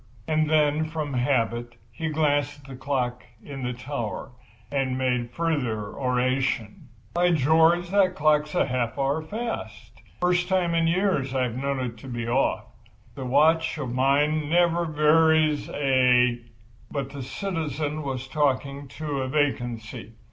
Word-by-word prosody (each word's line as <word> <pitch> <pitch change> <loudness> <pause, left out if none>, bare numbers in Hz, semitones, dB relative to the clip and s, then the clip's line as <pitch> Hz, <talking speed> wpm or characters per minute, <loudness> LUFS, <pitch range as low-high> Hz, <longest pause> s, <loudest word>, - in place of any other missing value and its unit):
And 155 -1 +1
then, 155 0 +3
from 155 -3 -4
habit, 120 -2 0 0.2
he 160 +7 -4
glanced 145 -2 0
at - - -20
the 135 - -8
clock 125 -2 -2 0.2
in 140 -2 -7
the 125 0 -2
tower, 125 -2 -5 0.4
and 135 -2 0
made 125 -2 0
further 125 -9 -2
oration. 125 -4 -1 0.3
"By 175 0 +3
George! 165 +4 +3
that 190 -2 +3
clock's 150 0 +2
half 125 -3 0
an - - -6
hour 140 +3 +1
fast! 155 - -6 0.2
First 180 0 +1
time 180 -3 +1
in 165 0 +2
ten 165 +1 +2
years 180 -9 0
I've 125 -3 0
known 140 +1 -2
it 120 -3 -4
to 120 - -12
be 120 -2 -4
off. 130 +3 +1 0.5
This 135 - -7
watch 160 +5 +3
of 130 -5 -4
mine 145 +4 +2
never 175 0 +3
varies 155 0 +3
a—" 125 -3 +3 0.4
But 140 -2 -4
the 140 - -7
citizen 155 -1 -3
was 135 -2 -4
talking 140 -1 -1
to 140 -1 -4
vacancy. 120 -6 -2
140 Hz, 145 wpm, -25 LUFS, 125-155 Hz, 0.5 s, then